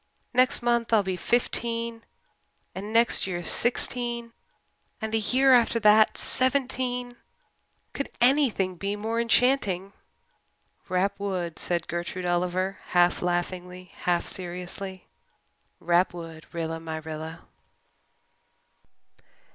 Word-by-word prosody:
Next 255 0 +3
month 235 -1 +1
I'll 220 -3 +5
be 190 -1 -2
fifteen 230 +2 -1 0.7
and 205 +3 -6
next 230 -3 +3
year 175 -2 -3
sixteen 240 +2 0 0.7
and 220 -1 -4
the 225 - +3
year 260 +5 +4
after 235 -1 +4
that 215 0 +5
seventeen. 255 -2 0 0.8
Could 280 - -3
anything 240 -9 +2
be 200 +3 -2
more 225 +3 -1
enchanting?" 220 -6 +2 1.0
"Rap 195 +2 0
wood," 180 -5 -3
said 170 -1 -2
Gertrude 175 +1 -4
Oliver, 180 +2 0 0.2
half 175 0 +4
laughingly, 180 +1 -3
half 175 -1 0
seriously. 180 +1 -6 0.7
"Rap 175 +1 +2
wood, 165 -2 -9
Rilla 165 -1 -3
my 160 -1 -5
Rilla." 160 +1 -7
195 Hz, 105 wpm, -26 LUFS, 175-235 Hz, 1.0 s, I'll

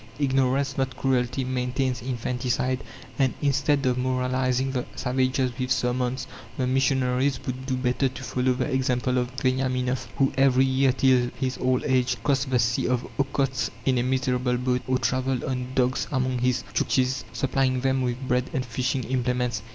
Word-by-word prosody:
Ignorance, 135 -1 +1
not 130 0 -1
cruelty, 130 0 0
maintains 125 0 -1
infanticide; 125 +1 -1 0.4
and, 135 -2 +2
instead 140 0 +1
of 125 0 +1
moralizing 130 0 0
the 125 -2 -1
savages 130 0 0
with 130 0 -1
sermons, 125 0 0 0.3
the 130 - 0
missionaries 130 0 +1
would 130 +1 -5
do 130 - 0
better 125 +1 +1
to 130 +1 -9
follow 130 0 +1
the 125 +1 -1
example 130 -2 0
of 125 0 -1
Veniaminoff, 130 -1 0
who, 135 - +2
every 135 -1 +4
year 135 0 +3
till 125 -1 +3
his 130 -1 -2
old 125 0 +1
age, 130 -1 +1
crossed 140 -1 +1
the 130 - +2
sea 115 0 +1
of 125 -1 0
Okhotsk 135 -1 0 0.2
in 130 -2 +2
a - - +2
miserable 125 -1 0
boat, 125 0 0
or 130 0 +2
travelled 130 0 0
on 125 -1 -2
dogs 130 0 +1
among 130 -2 0
his 125 0 +1
Tchuktchis, 130 0 +1
supplying 130 -1 0
them 135 0 +1
with 125 +1 -2
bread 125 0 +1
and 130 -1 -1
fishing 125 +2 -1
implements. 125 -3 -1
130 Hz, 165 wpm, -25 LUFS, 125-130 Hz, 0.4 s, every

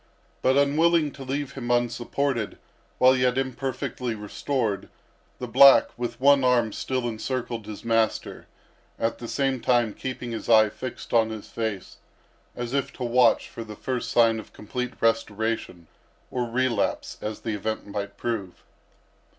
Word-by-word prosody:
But 130 +1 +3
unwilling 155 +2 +3
to 135 - -10
leave 140 +1 -3
him 125 -3 -6
unsupported 120 0 0 0.4
while 130 +1 +6
yet 125 0 +2
imperfectly 130 -2 -3
restored, 105 0 -2 0.5
the 125 - -5
black 135 +3 +7
with 120 -1 -4
one 140 0 +5
arm 120 -4 +3
still 130 -2 -2
encircled 115 -1 -4
his 105 +1 -8
master, 115 -1 0 0.5
at 115 0 -1
the 120 - -6
same 135 0 0
time 120 -4 +2
keeping 125 -1 -5
his 115 - -5
eye 110 -2 +6
fixed 130 +3 -7
on 115 -1 +4
his 110 -2 -7
face, 110 -5 -4 0.6
as 120 +1 -4
if 140 -1 0
to 130 - -6
watch 125 +1 +3
for 115 - -8
the 110 -1 -9
first 125 +3 -3
sign 115 -2 +4
of 110 - -12
complete 125 +4 -4
restoration, 110 -5 -1 0.5
or 125 -2 -2
relapse, 120 -3 -1
as 105 0 -5
the 110 - -3
event 110 +2 -3
might 100 0 -5
prove. 105 -6 -4
120 Hz, 150 wpm, -25 LUFS, 110-130 Hz, 0.6 s, black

